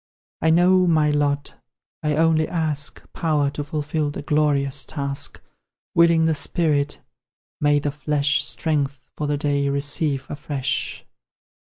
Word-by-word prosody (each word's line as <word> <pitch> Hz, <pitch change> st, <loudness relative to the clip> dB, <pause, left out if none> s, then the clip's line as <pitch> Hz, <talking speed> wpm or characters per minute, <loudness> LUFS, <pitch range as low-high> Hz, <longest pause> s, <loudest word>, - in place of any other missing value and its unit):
I 160 Hz, -, +3 dB
know 180 Hz, +2 st, +5 dB
my 155 Hz, -3 st, +3 dB
lot 145 Hz, -1 st, 0 dB, 0.5 s
I 150 Hz, -1 st, 0 dB
only 160 Hz, 0 st, +3 dB
ask 155 Hz, -4 st, -1 dB
Power 150 Hz, -4 st, +1 dB
to 145 Hz, -, -4 dB
fulfil 150 Hz, +1 st, -2 dB
the 145 Hz, -, -6 dB
glorious 145 Hz, -2 st, +1 dB
task; 140 Hz, -3 st, -3 dB, 0.5 s
Willing 170 Hz, -1 st, +5 dB
the 160 Hz, -, +3 dB
spirit, 150 Hz, -1 st, 0 dB, 0.6 s
may 145 Hz, -1 st, +3 dB
the 145 Hz, 0 st, -1 dB
flesh 145 Hz, +1 st, +1 dB
Strength 145 Hz, -4 st, -1 dB
for 150 Hz, -, -3 dB
the 145 Hz, 0 st, 0 dB
day 140 Hz, -1 st, 0 dB
receive 140 Hz, 0 st, -1 dB
afresh. 140 Hz, -2 st, -3 dB
150 Hz, 130 wpm, -22 LUFS, 140-160 Hz, 0.6 s, know